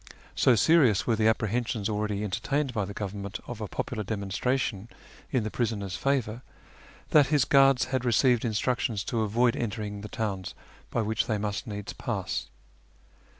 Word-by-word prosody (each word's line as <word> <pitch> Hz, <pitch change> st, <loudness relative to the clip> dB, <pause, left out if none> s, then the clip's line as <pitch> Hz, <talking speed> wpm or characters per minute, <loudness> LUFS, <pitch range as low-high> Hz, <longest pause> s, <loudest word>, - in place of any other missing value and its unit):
So 125 Hz, -, +5 dB
serious 130 Hz, -, +4 dB
were 115 Hz, -, +2 dB
the 110 Hz, 0 st, +2 dB
apprehensions 110 Hz, -1 st, 0 dB
already 105 Hz, -1 st, -1 dB
entertained 135 Hz, +7 st, -1 dB
by 105 Hz, -3 st, 0 dB
the 100 Hz, -, -7 dB
Government 100 Hz, -1 st, -5 dB
of 120 Hz, -2 st, -7 dB
a 105 Hz, -, -3 dB
popular 110 Hz, +2 st, -3 dB
demonstration 105 Hz, +2 st, -2 dB, 0.4 s
in 130 Hz, -5 st, +1 dB
the 110 Hz, -, -3 dB
prisoner's 105 Hz, -5 st, -2 dB
favour, 125 Hz, -4 st, -1 dB, 0.7 s
that 150 Hz, -3 st, +6 dB
his 145 Hz, -3 st, +3 dB
guards 135 Hz, -2 st, +5 dB
had 130 Hz, -2 st, +1 dB
received 120 Hz, 0 st, +3 dB
instructions 115 Hz, -1 st, 0 dB
to 115 Hz, +4 st, -1 dB
avoid 115 Hz, +3 st, +2 dB
entering 105 Hz, -3 st, -4 dB
the 105 Hz, -, -7 dB
towns 100 Hz, -4 st, -3 dB, 0.3 s
by 120 Hz, -, 0 dB
which 110 Hz, +1 st, 0 dB
they 110 Hz, -, 0 dB
must 105 Hz, +4 st, -3 dB
needs 105 Hz, -2 st, -5 dB
pass. -, -, -3 dB
110 Hz, 155 wpm, -28 LUFS, 105-125 Hz, 0.7 s, that